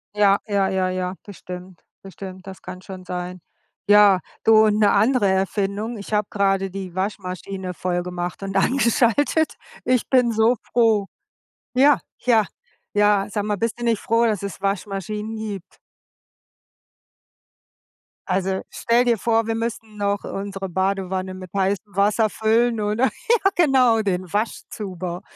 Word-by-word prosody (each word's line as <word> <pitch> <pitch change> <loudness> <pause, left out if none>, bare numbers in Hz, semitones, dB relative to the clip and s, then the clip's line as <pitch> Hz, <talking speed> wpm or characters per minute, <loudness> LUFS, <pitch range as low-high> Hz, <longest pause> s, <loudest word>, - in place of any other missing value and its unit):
Ja, 200 -1 +5
ja, 200 -2 +1
ja, 190 -1 0
ja, 185 0 -2
bestimmt, 180 -2 -10 0.2
bestimmt, 190 0 -10
das 190 -1 -9
kann 185 0 -9
schon 185 -1 -9
sein. 180 0 -5 0.5
Ja, 205 -2 +7 0.2
du, 220 0 +6
und 210 0 +2
'ne 205 -2 +5
andere 245 -3 +3
Erfindung, 200 +4 -1
ich 205 - -9
habe 210 -1 +1
grade 195 -1 +1
die 190 -2 -6
Waschmaschine 185 -1 -4
vollgemacht 180 +1 -3
und 195 0 -2
angeschaltet. 265 +7 +2 0.3
Ich 255 -2 +1
bin 250 -3 +4
so 225 +3 +3
froh. 220 -4 +2 0.7
Ja, 275 +1 +5 0.2
ja, 225 -4 +3 0.5
ja, 205 -1 +3
sag 205 -1 -2
mal, 210 -1 -1
bist 230 +3 -2
du - - -3
nicht 230 -3 +1
froh, 230 +1 +2
dass 210 -4 -1
es 200 -1 -6
Waschmaschinen 205 +2 -3
gibt? 210 -4 -7 2.5
Also, 190 0 0
stell 240 +2 +1
dir 235 -1 +3
vor, 225 +1 +1
wir 225 - 0
müssen 225 -1 -4
noch 200 -1 -1
unsere 195 -1 -5
Badewanne 190 0 -2
mit 185 -1 -9
heißem 195 +1 -1
Wasser 210 +2 +3
füllen 225 +2 +1
oder? 210 +5 +1
Ja 390 - +1
genau, 260 -8 +4
den 185 -4 -2
Waschzuber 185 -4 -4
200 Hz, 140 wpm, -22 LUFS, 190-225 Hz, 2.5 s, Ja